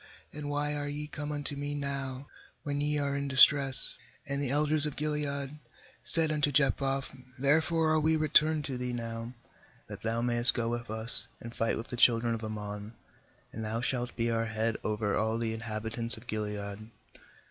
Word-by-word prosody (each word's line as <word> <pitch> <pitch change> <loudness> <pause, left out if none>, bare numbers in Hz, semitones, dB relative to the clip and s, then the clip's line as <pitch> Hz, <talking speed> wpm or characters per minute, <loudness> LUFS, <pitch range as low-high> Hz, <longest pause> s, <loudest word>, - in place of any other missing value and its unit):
and 145 -1 -6
why 145 0 -1
are 145 -1 -3
ye 145 +1 -4
come 150 0 -6
unto 145 -1 -2
me 145 +1 -4
now 140 -2 -4 0.4
when 145 -1 -2
ye 150 0 +1
are 140 -1 -1
in 140 0 -2
distress?' 135 0 +4 0.3
8And 140 0 -2
the 140 -3 -1
elders 150 +2 +4
of 150 - -5
Gilead 150 -1 -2 0.4
said 160 -2 +7
unto 150 -1 +1
Jephthah: 135 -1 +1 0.3
'Therefore 160 +4 +2
are 155 - +3
we 160 +1 +2
returned 155 0 +3
to 130 -3 -4
thee 125 0 -3
now, 115 0 -5 0.5
that - - -9
thou 115 +1 -1
mayest 120 0 +3
go 115 -2 -1
with 120 -1 -4
us, 110 +1 +3
and 115 0 -9
fight 115 - 0
with 115 - -7
the 120 - -5
children 115 -1 +4
of 115 -1 -5
Ammon, 105 0 -6 0.6
and 110 - -5
thou 110 +1 -2
shalt 125 0 -2
be 115 0 0
our 115 0 0
head 110 +1 -1
over 105 -1 -1
all 110 +1 0
the 115 -1 -1
inhabitants 115 +1 -4
of 110 - -13
Gilead.' 105 -1 -5
130 Hz, 180 wpm, -30 LUFS, 115-145 Hz, 0.6 s, said